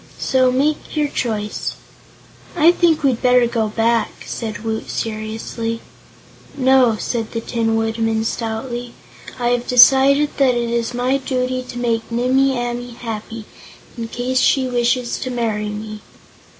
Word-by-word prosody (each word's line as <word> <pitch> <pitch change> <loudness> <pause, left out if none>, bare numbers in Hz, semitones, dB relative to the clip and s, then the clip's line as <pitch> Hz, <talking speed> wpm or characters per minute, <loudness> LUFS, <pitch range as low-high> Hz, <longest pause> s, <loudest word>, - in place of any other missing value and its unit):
So 255 -1 +2
make 290 +6 -1
your 300 -1 +2
choice." 215 -6 -3 0.8
"I 335 0 +6
think 340 -3 +2
we'd 260 -4 +1
better 250 -1 +4
go 230 -2 0
back," 225 +1 0
said 220 -2 -5
Woot 220 -1 -3
seriously 225 +1 -4 0.8
"No," 260 -3 +4
said 230 -3 -3
the 230 - -1
Tin 225 -1 -1
Woodman, 225 0 0
stoutly, 235 +2 -4 0.4
"I 240 -1 0
have 245 0 0
decided 270 +3 +6
that 265 -3 +3
it's 235 0 -1
my 250 +2 +1
duty 255 -1 -2
to 245 - -7
make 230 -2 -1
Nimmie 260 +3 +2
Amee 240 0 -4
happy, 225 -1 -6 0.5
in 230 -2 -5
case 250 +2 -1
she 265 0 +3
wishes 245 0 0
to 255 - -4
marry 220 -4 -2
me." 215 0 -7
240 Hz, 135 wpm, -19 LUFS, 225-255 Hz, 0.8 s, I